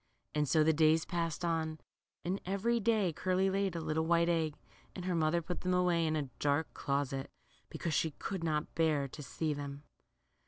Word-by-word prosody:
And 150 -1 +1
so 155 -2 +5
the 160 +1 +4
days 160 +1 +4
passed 170 -1 -2
on, 160 -2 -1 0.5
and 185 +3 -1
every 200 +6 +1
day 210 -5 +2
Curly 185 +3 +1
laid 195 -2 0
a - - -1
little 160 0 -1
white 170 0 +4
egg, 160 -3 +1 0.4
and 180 - -5
her 185 - 0
mother 165 +1 +2
put 175 +2 -4
them 180 0 +1
away 175 -2 +3
in 155 - +1
a 140 -4 -2
dark 145 +2 +1
closet, 140 -1 -1 0.4
because 165 - -3
she 160 - +2
could 170 +4 -5
not 155 -2 -1
bear 155 -4 +2
to 150 - -9
see 150 +4 -2
them. 140 0 -6
160 Hz, 190 wpm, -33 LUFS, 150-180 Hz, 0.5 s, so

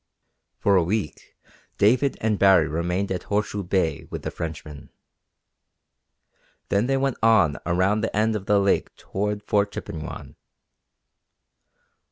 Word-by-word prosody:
For 100 - +2
a 90 - +3
week 95 -1 -4 0.4
David 125 +7 +3
and 110 -2 0
Baree 95 -5 +5
remained 90 +5 -2
at 90 - -2
Horseshoe 105 0 -1
Bay 90 -3 -1
with - - -6
the - - -4
Frenchman. 75 -3 -7 1.8
Then 100 +4 +1
they 135 0 +1
went 135 -1 -1
on 110 -9 +4
around 95 +5 +2
the 110 - -3
end 110 +1 +2
of 100 -2 -5
the 105 - +4
lake 100 0 +1
toward 105 +1 -3
Fort 100 0 +1
Chippewyan. 80 -2 -7
100 Hz, 130 wpm, -24 LUFS, 85-105 Hz, 1.8 s, Baree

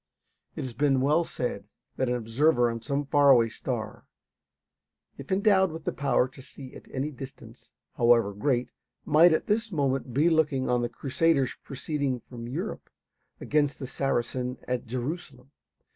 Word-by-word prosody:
It - - -4
has 130 -2 -5
been 135 +2 +2
well 150 +6 +3
said 120 -10 -4 0.3
that 130 -1 0
an 125 - +1
observer 120 +2 +2
on 115 0 -5
some 140 +2 -2
far 145 0 +4
away 120 -4 +6
star, 110 -2 -5 1.1
if 140 - -9
endowed 190 -2 +3
with 160 0 -8
the - - -1
power 140 -2 +1
to 130 +1 -14
see 130 0 -11
at - - -12
any 140 +3 -2
distance, 135 -1 -11 0.3
however 115 -3 +4
great, 125 +3 0 0.3
might 160 +3 +6
at 160 - +1
this 220 +1 0
moment 135 -5 -1
be 145 +7 +3
looking 155 -5 +2
on 125 0 +2
the 120 - -1
Crusaders 135 +1 +1
proceeding 140 -2 -3
from 120 0 -9
Europe 170 - -5 0.5
against 145 -2 +1
the 135 - -6
Saracen 125 -1 -2
at 125 -1 -2
Jerusalem. 130 +1 -5
135 Hz, 160 wpm, -27 LUFS, 125-150 Hz, 1.1 s, away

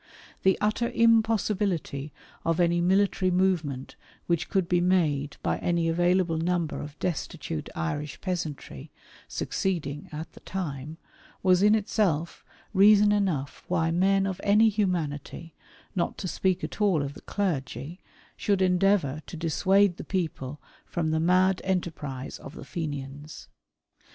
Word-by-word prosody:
The 190 -1 +3
utter 220 +3 +1
impossibility 210 -10 +1 0.3
of 165 +1 0
any 175 0 +3
military 190 +1 +2
movement 175 -8 0 0.3
which 170 -2 0
could 190 -3 +1
be 175 0 +2
made 155 -6 +1
by 85 +1 0
any 170 - +1
available 175 0 +2
number 170 -1 -1
of 145 0 -8
destitute 150 - -4
Irish 145 - -3
peasantry, 155 - -5 0.4
succeeding 150 -6 -3
at 155 +1 -6
the - - -15
time, 155 -5 -5 0.5
was 185 -1 +4
in 210 +1 +6
itself 195 -6 0 0.3
reason 205 +1 +6
enough 185 -10 -1
why 165 -2 +1
men 195 +3 +3
of 195 -1 -3
any 210 +2 +5
humanity, 170 -6 -2 0.4
not 175 - -1
to 190 - -4
speak 185 +2 0
at - - -5
all 185 -8 +3
of 140 0 -4
the - - -12
clergy, 155 - -3 0.4
should 200 -2 +1
endeavour 180 -5 +2
to 170 - -7
dissuade 185 +3 +3
the - - -6
people 150 -7 -3 0.2
from 160 -2 -2
the 160 - +1
mad 185 +3 +3
enterprise 155 -8 -3
of 140 - -10
the - - -9
Fenians. 145 -3 -6
175 Hz, 135 wpm, -27 LUFS, 150-190 Hz, 0.5 s, in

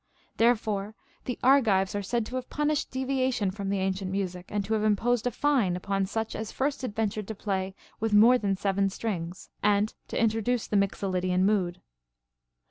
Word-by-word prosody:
Therefore 215 -3 +1 0.3
the 250 - -3
Argives 225 -8 +4
are 205 - -1
said 230 +3 -1
to 250 - -7
have 255 -1 -4
punislied 300 0 0
deviation 260 -6 0
from 200 0 -4
the 200 - 0
ancient 190 0 -1
music, 185 -2 -3
and 205 -1 -2
to 220 - -1
have 215 -1 +1
imposed 225 +3 +2
a - - 0
fine 255 -13 +2
upon 195 +1 -1
such 220 +2 -3
as 220 -1 -4
first 275 0 -1
adventured 215 -3 -2
to 220 - -5
play 190 -2 -2 0.2
with 225 0 -1
more 230 +5 +7
than 200 -3 0
seven 195 0 +1
strings, 185 -4 -5
and 205 +1 +2
to - - -3
introduce 225 +1 +1
the - - -3
Mixolydian 185 -2 +1
mood. 185 -4 +1
210 Hz, 175 wpm, -28 LUFS, 195-235 Hz, 0.3 s, more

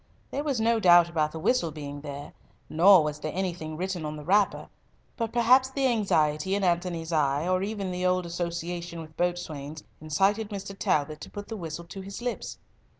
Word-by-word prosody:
There 285 - -2
was 280 -5 -1
no 230 +1 +2
doubt 175 -3 +6
about 155 -2 0
the - - -7
whistle 170 +1 +1
being 145 -2 -7
there, 145 0 -8 0.3
nor 180 +2 +6
was 150 0 -3
there 155 0 -4
anything 175 -4 -3
written 185 -1 -3
on 150 0 -4
the 150 - -8
wrapper; 200 +5 +2 0.5
but 230 -2 -2
perhaps 250 +2 +4
the 270 0 -1
anxiety 190 - +1
in 200 - -1
Antony's 170 -2 0
eye, 145 +1 +1
or 185 0 +2
even 200 -2 -3
the 180 0 0
old 180 0 +1
association 170 0 -4
with 155 -1 -12
boatswains, 160 -4 -3 0.2
incited 195 +8 +1
Mr. 200 -1 -6
Talbot 150 -4 0
to - - -8
put 205 0 -8
the 225 - -4
whistle 170 -3 -6
to 190 +3 -8
his 195 +1 -7
lips. 245 0 -4
175 Hz, 190 wpm, -27 LUFS, 155-200 Hz, 0.5 s, doubt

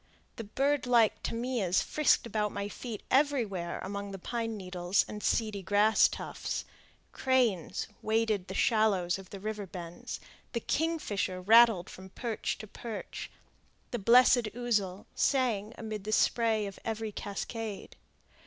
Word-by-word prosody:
The 225 - -5
bird 275 +5 0
like 235 -3 +4
tamias 230 -6 0
frisked 305 -5 +2
about 210 -2 -1
my 200 0 -3
feet 220 0 -7
everywhere 235 -12 +1
among 200 +1 -4
the 195 - -6
pine 225 +3 -3
needles 180 -1 0
and 210 - -7
seedy 215 -3 0
grass 205 +3 +4
tufts; - - -4 0.5
cranes 245 - +1 0.2
waded 220 -3 +1
the 190 - -6
shallows 195 -6 +2
of 190 -1 -12
the 200 - -8
river 210 0 -4
bends, 175 -2 -7 0.3
the 235 - 0
kingfisher 235 - -1
rattled 220 -1 +6
from 190 +1 -11
perch 230 +2 -3
to - - -8
perch, 220 +1 -7
and - - -34
the 240 - -2
blessed 245 +2 +6
ouzel 210 -6 -1
sang 230 -6 +1
amid 215 -3 -5
the 215 - -3
spray 220 -1 +2
of 200 -1 -7
every 225 -1 -3
cascade. 205 +1 -5
215 Hz, 140 wpm, -30 LUFS, 195-235 Hz, 0.5 s, rattled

